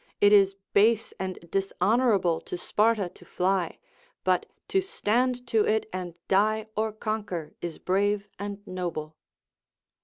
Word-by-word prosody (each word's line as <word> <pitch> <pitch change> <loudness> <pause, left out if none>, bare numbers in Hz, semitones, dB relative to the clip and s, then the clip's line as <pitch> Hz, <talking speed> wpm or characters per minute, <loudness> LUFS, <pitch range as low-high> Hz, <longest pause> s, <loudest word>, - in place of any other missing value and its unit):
it 205 0 +6
is 195 -1 +6 0.2
base 220 +2 +4
and 185 -1 -3
dishonorable 195 -2 +2
to - - -5
Sparta 210 +1 +2
to - - -17
fly, 185 -1 0 0.5
but - - +2 0.2
to 385 - +2
stand 250 - 0
to 225 -3 +3
it 220 +1 +1
and 180 -2 -4
die 215 +3 +2
or 220 +1 0
conquer 210 -6 -4
is 170 -2 -4
brave 200 +2 +1
and 205 0 -6
noble. 170 -5 -4
205 Hz, 130 wpm, -27 LUFS, 185-220 Hz, 0.5 s, it